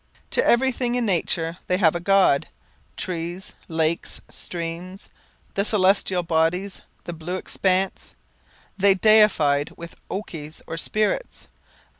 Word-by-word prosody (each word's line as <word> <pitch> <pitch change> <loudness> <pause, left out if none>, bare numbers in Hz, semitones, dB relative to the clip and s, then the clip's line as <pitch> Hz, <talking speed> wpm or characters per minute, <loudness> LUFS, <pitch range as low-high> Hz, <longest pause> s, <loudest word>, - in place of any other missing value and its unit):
To 480 - +3
everything 245 - +2
in 245 -1 0
nature 170 -3 0
they 180 - +2
gave 170 -5 +4
a 175 - -2
god; 190 -5 +3 0.5
trees, 175 +2 -4
lakes, 160 0 -1
streams, 175 +3 -6 0.4
the 200 - +1
celestial 190 -3 +2
bodies, 170 +4 0 0.2
the 175 - -6
blue 165 +3 -5
expanse, 185 0 -1 0.6
they 195 0 +4
deified 190 -9 +4
with 170 0 -9
okies 160 -6 -6
or - - -5
spirits. 215 - -2
185 Hz, 115 wpm, -23 LUFS, 165-200 Hz, 0.6 s, gave